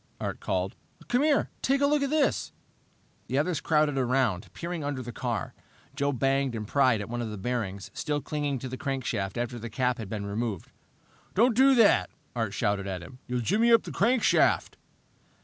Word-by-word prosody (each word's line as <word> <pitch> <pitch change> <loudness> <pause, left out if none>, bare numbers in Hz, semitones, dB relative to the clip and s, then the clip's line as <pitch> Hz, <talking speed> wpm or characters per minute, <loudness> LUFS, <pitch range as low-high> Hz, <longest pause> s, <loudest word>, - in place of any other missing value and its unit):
Art - - -4
called. 95 +1 -2 0.3
"Come 245 +2 +3
here! 295 -1 +2 0.2
Look 285 +2 +3
at 280 - 0
this!" 305 -1 +1 0.7
The 130 - -1
others 155 +2 0
crowded 150 -3 +2
around, 125 -7 0
peering 170 -2 -5
under 140 -3 -3
the 120 - -6
car. 120 -5 -3 0.4
Joe 140 0 +1
banged 135 -1 +1
and 105 -2 -4
pried 130 -4 +3
at 105 - -5
one 120 +1 -3
of 115 - -3
the 105 - -6
bearings, 100 -3 -3
still 150 -1 -1
clinging 145 -2 -2
to 130 - -6
the 130 0 -6
crankshaft 120 -8 -2
after 120 0 -3
the 115 +1 -6
cap 125 +1 0
had 110 -4 -6
been 105 -1 -4
removed. 105 -2 -3 0.6
"Don't 235 +3 +4
do 265 +2 +6
that!" 230 -4 +5 0.3
Art 110 -4 -2
shouted 100 0 0
at 90 -2 -4
him. 125 +8 -12
"You'll 125 0 -1
jimmy 220 - +3
up 230 - +6
the - - -7
crankshaft!" 235 +4 +3
130 Hz, 185 wpm, -28 LUFS, 110-160 Hz, 0.7 s, do